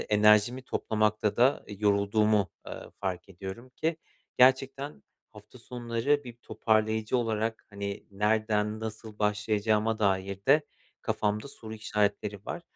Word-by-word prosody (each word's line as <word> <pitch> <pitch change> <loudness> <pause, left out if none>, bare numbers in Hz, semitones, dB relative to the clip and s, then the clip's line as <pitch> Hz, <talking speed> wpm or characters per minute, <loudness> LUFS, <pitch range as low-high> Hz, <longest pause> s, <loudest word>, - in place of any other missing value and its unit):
enerjimi 105 +4 +4
toplamakta 110 -3 0
da 125 +4 +3
yorulduğumu, 105 -1 +2 0.2
eee, - - -8
fark 95 -1 -3
ediyorum 95 +6 -8
ki 160 +5 -1 0.4
gerçekten 135 +2 +3 0.3
hafta 105 +4 -14
sonları 120 +4 -1
bir 120 -2 -9
toparlayıcı 110 -1 0
olarak, 110 -1 -1
hani, 100 -1 -5
nereden 105 +1 +1
nasıl 110 -1 -7
başlayacağıma 105 +1 +1
dair 95 -2 0
de 150 +3 +6 0.4
kafamda 105 +4 -1
soru 110 -4 -9
işaretleri 105 -1 -1
var. 175 - -4
110 Hz, 115 wpm, -29 LUFS, 105-115 Hz, 0.4 s, de